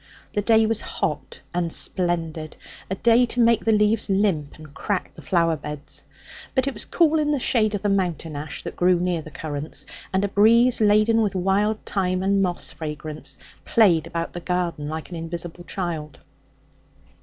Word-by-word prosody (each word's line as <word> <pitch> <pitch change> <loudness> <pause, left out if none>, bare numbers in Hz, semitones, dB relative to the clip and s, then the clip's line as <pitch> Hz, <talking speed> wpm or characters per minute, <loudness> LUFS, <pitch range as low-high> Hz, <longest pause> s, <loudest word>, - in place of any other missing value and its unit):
The 205 - +1
day 220 +1 +4
was 225 0 0
hot - - -4
and 175 -1 -1
splendid, 165 -4 -1 0.3
a 190 - -1
day 235 +4 +4
to 245 - -3
make 235 -1 +4
the 225 - +2
leaves 210 +1 +2
limp 190 -7 0
and 155 -2 -13
crack 195 +4 -3
the - - -12
flower 170 -3 +2
beds. 150 -1 -7 0.5
But 260 -1 +3
it 275 - -1
was - - -3
cool 320 -2 +3
in 300 -1 +1
the 290 -2 +1
shadow 215 -4 +2
of 205 - -5
the 205 - +2
mountain 175 -5 -1
ash 145 0 -5
that - - -6
grew 180 0 +3
near 175 -2 0
the 155 - -10
currants, 150 0 -6 0.3
and 190 +1 +1
a - - 0
breeze 230 +5 +4
laden 215 +2 +4
with 205 -3 0
wild 200 +4 +1
thyme 185 -2 0
and 195 0 +2
moss 180 -2 -1
fragrance 155 -1 -6 0.3
played 185 -9 +3
about 165 0 -4
the 175 - -5
garden 175 -4 -2
like 160 +3 -6
an - - -5
invisible 170 +1 -5
child. 165 -7 -4
185 Hz, 180 wpm, -23 LUFS, 165-215 Hz, 0.5 s, day